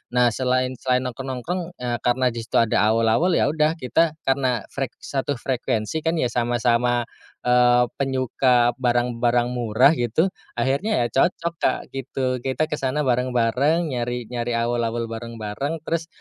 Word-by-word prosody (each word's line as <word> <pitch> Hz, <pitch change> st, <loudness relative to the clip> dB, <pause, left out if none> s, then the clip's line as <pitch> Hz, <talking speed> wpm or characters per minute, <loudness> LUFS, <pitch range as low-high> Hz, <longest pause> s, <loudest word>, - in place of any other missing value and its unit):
Nah 125 Hz, -1 st, +5 dB
selain 130 Hz, +1 st, 0 dB
selain 125 Hz, -1 st, +1 dB
nongkrong-nongkrong 135 Hz, +8 st, -5 dB
eee, 120 Hz, -1 st, -1 dB
karena 125 Hz, +1 st, +2 dB
di 115 Hz, -, -6 dB
situ -, -, -7 dB
ada 115 Hz, -, +1 dB, 0.2 s
awul-awul, 115 Hz, +11 st, +2 dB
ya -, -, +3 dB
udah 155 Hz, 0 st, +2 dB
kita 160 Hz, +3 st, +1 dB
karena 130 Hz, -2 st, 0 dB
frek 135 Hz, -3 st, -4 dB
satu 140 Hz, +1 st, -2 dB
frekuensi 120 Hz, +1 st, -2 dB
kan 165 Hz, +2 st, -1 dB
ya 125 Hz, -7 st, 0 dB
sama-sama 120 Hz, 0 st, +1 dB, 0.4 s
eee, 125 Hz, 0 st, +4 dB, 0.2 s
penyuka 130 Hz, -2 st, +2 dB
barang-barang 120 Hz, -1 st, +1 dB
murah 120 Hz, +2 st, +3 dB
gitu, 155 Hz, -, +1 dB, 0.2 s
akhirnya 135 Hz, -, +1 dB
ya -, -, +1 dB
cocok 170 Hz, +3 st, +1 dB
Kak 130 Hz, -, +2 dB
gitu. 130 Hz, -1 st, -2 dB
Kita 130 Hz, +4 st, -1 dB
kesana 150 Hz, 0 st, -1 dB
bareng-bareng, 130 Hz, +5 st, +1 dB
nyari 120 Hz, 0 st, -2 dB
nyari 120 Hz, -1 st, -2 dB
awul-awul 115 Hz, 0 st, -1 dB
bareng-bareng. 115 Hz, +7 st, -5 dB
Terus 165 Hz, 0 st, -2 dB
125 Hz, 140 wpm, -23 LUFS, 120-140 Hz, 0.4 s, Nah